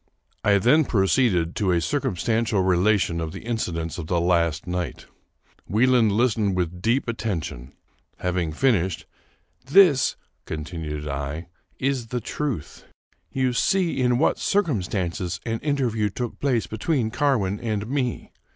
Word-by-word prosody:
I 100 -1 +4
then 135 +10 +4
proceeded 95 -5 +2
to 100 -3 +1
a 85 -2 +3
circumstantial 105 +5 0
relation 90 -2 +2
of 80 -1 -4
the - - -7
inci 115 -5 -2
dents 80 0 -4
of 80 - -6
the 85 0 +1
last 85 -2 +1
night. 90 -1 -4 0.6
Wieland 115 +1 +3
listened 105 -3 +2
with 90 -1 -2
deep 120 +6 +1
atten 110 -6 -2
tion. 65 -1 -8 0.4
Having 90 -3 -1
finished, 95 -6 +1 0.3
" - - -40
This," 175 -10 +6 0.3
continued 75 -1 -5
I, 70 +4 -4
" - - -41
is 130 -4 -2
the 125 +1 -2
truth. 125 - -4 0.5
You 130 -2 0
see 180 - +1
in 125 -1 +3
what 150 - +2
circumstances 95 - -1
an 115 0 -2
interview 125 -8 0
took 120 +4 -5
place 130 -5 +1
between 110 +1 -1
Carwin 115 -9 +1
and 105 -3 -2
me. 125 0 -2
105 Hz, 140 wpm, -24 LUFS, 85-125 Hz, 0.6 s, This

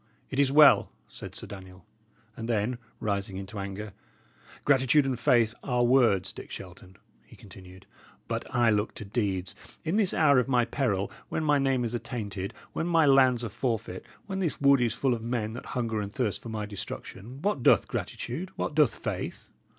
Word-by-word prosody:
"It 135 - -2
is 140 -1 +4
well," 150 0 +7 0.2
said - - -10
Sir - - -6
Daniel; 95 -3 -11 0.5
and 115 +1 -6
then, 115 +2 0 0.2
rising 100 -2 -2
into 100 +2 -7
anger: 100 +1 -6 0.7
"Gratitude 135 +1 +4
and 130 -3 -2
faith 115 -2 +3
are 125 -2 0
words, 120 -6 +3
Dick - - -10
Shelton," 95 0 -10 0.3
he - - -17
continued; 95 0 -14 0.4
"but - - -2
I 120 -2 +3
look 105 0 0
to 110 - -7
deeds. 100 -4 -2 0.3
In 165 +6 +1
this 205 -4 +3
hour 145 -4 +4
of 125 - 0
my 125 -3 +3
peril, 110 -6 -1 0.2
when 160 - -2
my 145 -2 +3
name 135 -3 +1
is 115 - -3
attainted, 105 -5 -4 0.2
when 165 - -2
my 165 -2 +4
lands 130 -3 +5
are 115 - -3
forfeit, 110 -4 -3 0.2
when 195 -2 -4
this 175 -5 -1
wood 140 -2 +5
is 120 -2 +1
full 135 -2 +1
of 115 - -3
men 115 -2 -2
that 120 - -8
hunger 115 -3 -1
and 100 -1 -5
thirst 105 -5 -1
for 115 - -8
my 110 -1 -3
destruction, 105 +4 -8
what 200 -9 0
doth - - +5
gratitude? 160 +10 -4
what - - -3
doth 145 -6 +3
faith? - - -5
120 Hz, 185 wpm, -28 LUFS, 100-135 Hz, 0.7 s, well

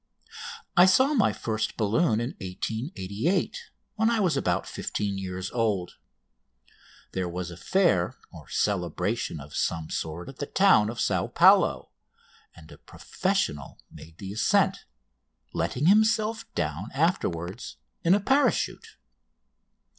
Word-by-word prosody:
I 180 +1 +7
saw 260 +10 +4
my 225 -8 +3
first 110 -1 -3
balloon 110 +3 +2
in 120 +2 -2
1888, 110 - -3 0.3
when 220 +1 +3
I 230 -1 +1
was 180 -7 +2
about 90 -10 0
fifteen 100 -2 -3
years 95 -1 -5
old. 105 -7 -1 1.1
There 90 -2 -2
was 90 0 -5
a - - -8
fair 130 - +1 0.2
or - - -12
celebration 90 -1 -1
of 70 +1 -11
some 80 -2 -2
sort 80 +2 -4
at 135 - -10
the 145 - -3
town 190 - +4
of 120 - -6
Sao - - 0
Paulo, - - +4 0.6
and 80 - -15
a - - -14
professional 70 -2 -3
made 80 +1 -14
the 95 +1 -7
ascent, 110 - +2 0.7
letting 135 +4 -1
himself 215 +3 +3
down 80 +8 -2
afterwards 110 - -1 0.3
in 170 +3 +5
a - - +2
parachute. 265 +4 0
110 Hz, 125 wpm, -27 LUFS, -, 1.1 s, I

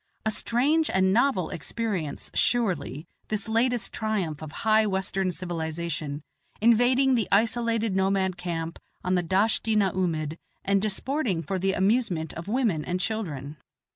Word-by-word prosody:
A 220 - +2
strange 285 +9 +2
and 190 0 +3
novel 220 - +2
experience, 175 - -3
surely, 180 - 0 0.2
this 215 -1 -3
latest 235 +2 +1
triumph 195 -9 -2
of 155 -1 -7
high 220 0 +5
Western 190 -1 0
civilization, 160 -3 -3 0.4
invading 245 +4 +4
the 230 -4 +1
isolated 230 0 +2
nomad 190 -1 +1
camp 170 -2 -4 0.2
on 180 - 0
the 180 - +3
Dasht 200 +6 +1
i - - +3
na 200 -3 +3
oomid 160 -4 -1 0.3
and 195 0 +3
disporting 215 - -1
for 185 +5 -2
the 195 +1 +1
amusement 190 -5 +1
of 165 - -7
the 205 - -5
women 220 - +1
and 180 +3 -2
children. 155 - -3
190 Hz, 145 wpm, -26 LUFS, 170-225 Hz, 0.4 s, high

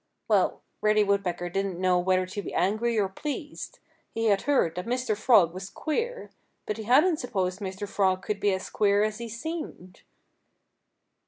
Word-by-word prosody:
Well, - - +2 0.2
Reddy 215 0 +4
Woodpecker 195 -3 0
didn't 195 -1 -2
know 185 -1 +3
whether 185 +1 +2
to 190 +3 -5
be - - -7
angry 220 +5 +1
or 200 -2 +2
pleased. 290 +9 -6 0.4
He 225 0 0
had 200 -1 +3
heard 255 - +3
that 180 +3 -5
Mr. 250 -2 0
Frog 205 -6 +4
was 190 +1 -7
queer. 465 - -3 0.3
But 210 - -3
he 220 - -6
hadn't 300 - +4
supposed 190 -8 -2
Mr. 195 0 -5
Frog 190 -2 +1
could 210 -1 -2
be 205 0 +2
as 190 0 -3
queer 205 -1 +3
as 215 0 -2
he 235 -1 -5
seemed. 235 - -6
205 Hz, 170 wpm, -27 LUFS, 185-235 Hz, 0.4 s, Reddy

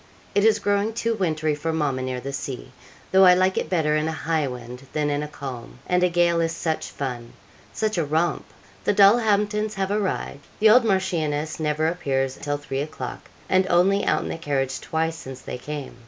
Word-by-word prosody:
It 200 0 +3
is 220 -1 +5
growing 205 +1 0
too 230 0 0
wintry 155 -7 0
for 150 +3 -2
mamma 145 -5 -1
near 130 -1 -3
the 135 +2 -6
sea, 130 -2 -5 0.4
though 190 0 +6
I 180 -1 +8
like 185 +1 +2
it - - -2
better 155 -4 +1
in 155 +1 0
a - - -1
high 160 -1 -1
wind 125 +1 -8
than 150 -1 0
in 145 0 0
a 150 - -4
calm; 130 -5 -8
and 180 0 +1
a 180 - +4
gale 170 -1 +2
is 165 0 0
such 160 -1 -2
fun 125 -4 -5 0.4
such 215 -4 -1
a - - +2
romp. 160 +4 0 0.4
The 205 - +1
Dulhamptons 210 0 +4
have 195 0 -1
arrived: 195 -8 -2
the 215 0 +6
old 245 +2 +7
Marchioness 160 -7 0
never 155 0 0
appears 135 -6 -1
till 145 0 -1
three 140 -2 -4
o'clock, 155 +2 -6 0.2
and 185 0 +3
only 195 +3 +3
out - - +1
in - - -5
the - - -4
carriage 135 -4 -1
twice 160 0 -1
since 130 -4 -9
they 125 - -6
came. 145 0 -6
160 Hz, 200 wpm, -24 LUFS, 145-190 Hz, 0.4 s, I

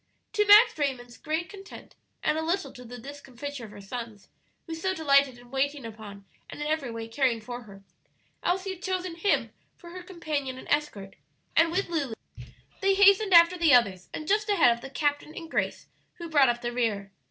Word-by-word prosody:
To 420 -1 +3
Max 440 +3 +8
Raymond's 250 -4 -2
great 320 +2 -2
content 395 -1 -12 0.3
and - - +2
a 315 - -1
little 345 +4 -1
to 250 - -11
the 245 +1 -9
discomfiture 275 0 -8
of - - -11
her 205 - -12
sons, 225 0 -8 0.4
who 330 - -6
so 375 +4 -2
delighted 280 -5 +3
in 245 0 -17
waiting 275 0 -1
upon 210 -3 -10 0.2
and - - -9
in 295 - -3
every 305 -4 -1
way 230 -1 -6
caring 240 -1 +1
for 240 +2 -8
her, 195 -1 -14 0.6
Elsie 375 +2 -1
had 365 - -14
chosen 370 -2 -2
him 340 +4 0 0.2
for 345 - -13
her 365 +1 -8
companion 305 -7 -4
and - - -11
escort, 215 -11 -2 0.4
and 330 0 +4
with 385 +3 0
Lulu 290 -9 -2 0.6
they 390 0 +2
hastened 400 -1 +5
after 340 +1 +7
the 320 -6 +6
others 195 -7 +1
and 310 - -6
just 420 +2 +1
ahead 335 -12 +5
of 235 - -10
the 270 - -8
captain 290 +2 -2
and 330 -1 -8
Grace, - - -2 0.3
who 340 -1 -8
brought 285 -5 +5
up 240 0 -1
the 240 - -2
rear. 215 -5 -2
290 Hz, 200 wpm, -27 LUFS, 240-345 Hz, 0.6 s, Max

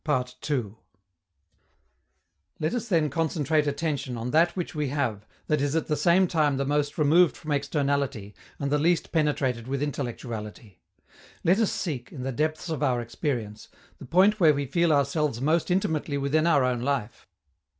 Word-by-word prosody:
Let 125 -3 0 2.4
us 240 -2 -3
then 160 - +1
concentrate 155 -1 0
attention 140 -4 -2
on 115 +2 -4
that 170 +3 +3
which 180 -3 -4
we 150 -2 -1
have 120 -7 -2 0.2
that 150 -2 0
is 145 +1 0
at 165 - 0
the 150 - 0
same 170 +5 +4
time 150 -5 +1
the 140 - -1
most 145 +1 -1
removed 160 +1 +4
from 155 - -6
externality 140 -6 -1 0.2
and 140 -1 -3
the 150 - +2
least 170 +2 +1
penetrated 140 -7 0
with 135 +1 -2
intellectuality. 115 - -6 0.6
Let 185 +5 +3
us 225 - +2
seek, 135 -9 -4
in 130 -5 -7
the 135 - -2
depths 155 +6 -2
of 160 -3 -3
our 130 -4 +1
experience, 115 -3 -4 0.3
the - - -9
point 190 +9 +4
where 155 -5 +5
we 140 0 -2
feel 170 +5 +1
ourselves 140 -2 +1
most 155 +6 +1
intimately 160 -5 0
within 145 +4 +1
our 145 -5 +4
own 125 -2 0
life. 125 -4 -3
145 Hz, 160 wpm, -26 LUFS, 130-160 Hz, 2.4 s, where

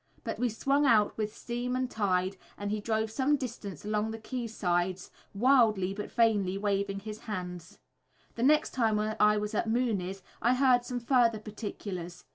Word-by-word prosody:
But - - -4
we 245 - +2
swung 275 +6 +1
out 215 -4 +4
with 215 -1 -3
steam 245 +1 -3
and 255 0 0
tide, 190 -4 0 0.2
and 205 0 -3
he 210 0 -1
drove 220 0 -1
some 275 +5 +2
distance 215 - -6
along 210 +1 0
the 225 - -5
quay 240 +2 -4
sides 180 -3 -1 0.2
wildly 215 -5 +4
but 210 +1 -6
vainly 205 -5 +2
waving 200 -1 -1
his 215 +1 -7
hands. 180 -5 -6 0.6
The 230 - -6
next 300 +4 +4
time 225 -4 +2
I 210 0 +3
was 210 +1 -3
at 220 +1 0
Mooney's 200 -6 -1 0.2
I 240 +2 +3
heard 255 -2 +4
some 245 -1 -3
further 235 -2 +3
particulars. 200 -5 -7
215 Hz, 170 wpm, -30 LUFS, 200-240 Hz, 0.6 s, out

